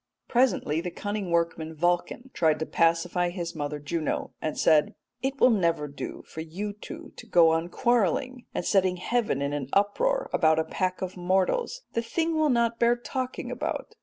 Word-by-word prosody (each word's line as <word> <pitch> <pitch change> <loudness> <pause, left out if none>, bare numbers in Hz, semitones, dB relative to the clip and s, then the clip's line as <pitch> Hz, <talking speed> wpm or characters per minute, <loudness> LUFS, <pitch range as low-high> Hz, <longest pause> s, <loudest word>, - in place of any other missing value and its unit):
Presently 240 - +2
the 180 - -3
cunning 205 +1 -4
workman 165 -1 0
Vulcan 175 - -1
tried 155 -2 +2
to 160 - -2
pacify 170 +2 +2
his 175 -1 -4
mother 150 -1 -3
Juno, 155 +2 -3
and 155 - -3
said, 150 -2 +3 0.3
'It 270 +1 -2
will 255 - +6
never 170 -8 +1
do 140 - -7
for 160 - -7
you 190 +6 -5
two 320 +9 -10
to 240 - -10
go 170 -6 +6
on 165 +1 0
quarrelling 240 +3 0
and - - -3
setting 185 -2 +2
heaven 210 - 0
in 140 +1 -1
an 140 -3 -3
uproar - - +2
about 160 -2 +4
a 160 - +2
pack 185 +3 -2
of 185 0 -5
mortals. 190 - 0
The 230 - +1
thing 325 +7 -1
will 310 -1 +3
not 235 -2 +1
bear 235 0 +4
talking 255 +1 -4
about. - - -4
185 Hz, 180 wpm, -27 LUFS, 165-240 Hz, 0.3 s, will